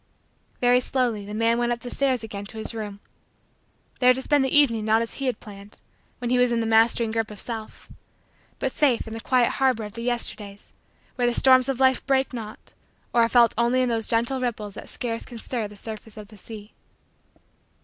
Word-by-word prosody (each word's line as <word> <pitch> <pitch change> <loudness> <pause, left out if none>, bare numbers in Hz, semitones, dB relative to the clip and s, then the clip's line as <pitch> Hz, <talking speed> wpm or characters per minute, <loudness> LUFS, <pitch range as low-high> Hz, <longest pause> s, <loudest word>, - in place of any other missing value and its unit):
Very 245 0 +5
slowly 245 -5 -1
the 210 - -6
man 230 +1 +2
went 240 0 0
up 240 0 -2
the 245 - -7
stairs 260 -4 0
again 205 -2 -7
to 220 - -9
his 220 - -2
room; 210 -3 -6 1.0
there 250 0 +5
to 265 - -4
spend 290 -1 +2
the 265 - 0
evening 230 -7 +4
not 220 +1 +3
as 230 - -7
he 275 - -2
had 245 -4 -1
planned, 200 -1 -12 0.4
when 245 -1 -4
he 250 - +3
was 250 -1 +3
in 235 - +1
the 225 - -1
mastering 225 0 +3
grip 225 -1 -1
of 210 -2 -9
self, 225 -2 -6 0.7
but - - -2
safe 270 -6 +1
in 220 - -7
the 225 - -5
quiet 250 0 +2
harbor 260 -5 +1
of 210 -1 -8
the 230 - -7
Yesterdays 220 -4 -4 0.4
where 245 -1 +2
the 240 - +1
storms 260 0 +5
of 265 -2 -2
life 260 -1 +3
break 270 -1 +1
not 220 -3 -8 0.4
or 235 - +4
are 230 - +3
felt 235 -2 +5
only 245 +2 +2
in 250 - 0
those 225 -2 -1
gentle 235 +3 +1
ripples 220 -5 -3
that - - -9
scarce 230 -2 -3
can 240 - -10
stir 225 -1 -3
the 205 - -14
surface 220 +1 -8
of 210 -1 -10
the 215 - -15
sea. 210 +1 -11
230 Hz, 215 wpm, -24 LUFS, 220-250 Hz, 1.0 s, Very